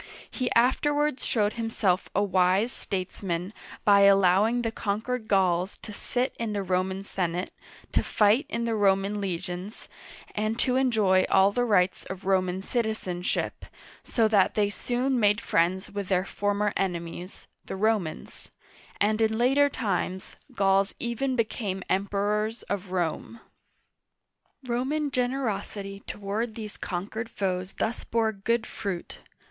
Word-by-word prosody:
He 255 -2 -2
afterwards 290 +3 +2
showed 210 -2 +1
himself 225 -5 0
a 200 - +3
wise 190 +4 +2
statesman 185 -1 -4 0.3
by 200 -1 +6
allowing 200 +4 +5
the 225 - -1
conquered 220 +3 -2
Gauls 185 -2 +2
to 210 - -7
sit 250 +5 -2
in 225 -2 -2
the 200 -1 -1
Roman 190 +1 -1
senate, 180 -2 -2 0.4
to - - +2
fight 215 +8 +3
in 235 0 -2
the 230 - 0
Roman 200 0 +2
legions, 185 +2 -5 0.5
and 215 +2 -1
to 250 +1 +1
enjoy 215 -8 +3
all 195 +1 +5
the 245 +3 +1
rights 190 -5 +2
of 190 0 -7
Roman 185 -1 +1
citizenship, 215 -6 -2 0.4
so 225 -2 +2
that 205 -3 +3
they 205 -1 +2
soon 250 +4 -1
made 210 -1 +4
friends 180 +1 0
with 200 -1 -4
their 185 -1 +1
former 205 +1 0
enemies, 175 -1 -4 0.2
the - - -5
Romans; 200 -5 -1 0.5
and 215 +2 +2
in 220 0 +2
later 270 +4 +4
times, 190 -7 -2 0.2
Gauls 195 0 +2
even 255 +3 -1
became 210 -5 -2
Emperors 205 +3 0
of 200 -2 -4
Rome. 180 +5 -2 1.2
Roman 265 +5 -1
generosity 225 -6 -2
toward 210 +3 -3
these 215 -2 -6
conquered 210 +5 -4
foes 185 -1 -2
thus 225 - -2
bore 225 -1 +1
good 220 +3 -1
fruit. 190 -4 -5
205 Hz, 130 wpm, -27 LUFS, 190-230 Hz, 1.2 s, by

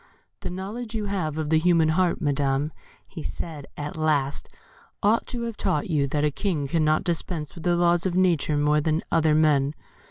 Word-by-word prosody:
"The - - -5
knowledge 215 +6 -6
you 215 -1 -2
have 180 -7 -2
of 155 -1 -2
the 160 - +5
human 165 -1 +3
heart, 175 +2 +2
Madam," 145 -1 +1 0.5
said 150 -4 -6
he, - - -4
at 145 - -5
last, 150 -3 0 0.5
"ought 215 +3 +3
to 240 -2 -4
have 230 -2 -4
taught 180 -3 -1
you 145 -3 +2
that 145 +2 -1
a 150 - +1
King 155 -4 -2
cannot 155 0 +2
dispense 170 -3 -2
with 170 -2 -10
the 175 -1 +3
laws 175 +1 +3
of 175 - -2
nature 170 -5 +2
more 150 +1 +3
than 155 +2 0
other 160 -2 +3
men. 150 -2 +3
160 Hz, 190 wpm, -25 LUFS, 150-180 Hz, 0.5 s, the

